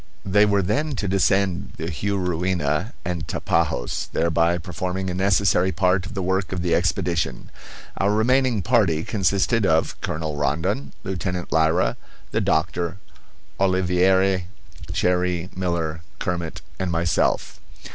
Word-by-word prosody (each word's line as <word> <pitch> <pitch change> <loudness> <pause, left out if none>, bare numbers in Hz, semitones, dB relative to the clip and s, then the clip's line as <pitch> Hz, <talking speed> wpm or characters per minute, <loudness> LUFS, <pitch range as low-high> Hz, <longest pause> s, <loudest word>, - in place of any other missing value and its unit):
They 105 +2 +4
were 100 -1 +2
then 140 +10 0
to 105 - -2
descend 95 0 +1
the 80 - -4
Juruena 90 -1 -1
and 85 -2 -3
Tapajos, - - -1
thereby 85 +1 +2
performing 90 +2 -3
a - - -3
necessary 95 -1 +2
part 90 0 +1
of - - -10
the 95 - -2
work 95 +1 0
of 90 -2 -2
the 85 - +1
expedition. 90 -1 0 0.5
Our 100 +1 +2
remaining 120 0 +2
party 100 -9 +2
consisted 100 +3 +1
of 80 -4 +1
Colonel 80 -1 -3
Rondon, 70 -1 -1
Lieutenant 90 -1 -3
Lyra, 80 +3 +2 0.3
the - - +1
doctor, 85 +1 0 0.6
Oliveira, 95 0 +3 0.5
Cherrie, 90 0 0
Miller, 85 -3 -2 0.2
Kermit, 85 -2 -3 0.2
and 95 -2 -1
myself. 85 0 0
90 Hz, 125 wpm, -23 LUFS, 85-95 Hz, 0.6 s, They